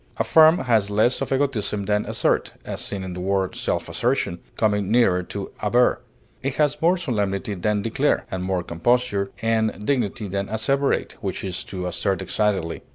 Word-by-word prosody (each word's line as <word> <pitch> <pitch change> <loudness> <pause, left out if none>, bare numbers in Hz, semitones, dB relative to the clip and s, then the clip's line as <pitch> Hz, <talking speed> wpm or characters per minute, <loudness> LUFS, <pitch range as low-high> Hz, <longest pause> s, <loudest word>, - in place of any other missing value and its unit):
Affirm 160 +1 +6
has 110 -5 +2
less 110 +5 +2
of - - -3
egotism 125 -7 0
than 105 +1 0
assert - - 0
(as - - -5
seen 100 -2 -4
in 95 -1 -5
the 90 - -6
word 95 0 0
self - - -2
assertion), 85 - -1 0.2
coming 105 -3 +1
nearer 110 -6 +4
to 100 +2 -6
aver. 120 +4 +3 0.4
It 135 0 -2
has 150 -1 +1
more 175 +3 +4
solemnity 105 - -2
than 105 +2 -1
declare, 135 +6 +1
and 95 -1 -3
more 95 -1 -1
composure 100 +3 0
and 110 -2 0
dignity 115 -5 -1
than 100 +1 -3
asseverate, 135 +6 0
which 95 -5 -4
is 95 -2 -3
to 90 -2 -5
assert 95 +2 -1
excitedly. 95 -3 -1
105 Hz, 165 wpm, -23 LUFS, 95-125 Hz, 0.4 s, Affirm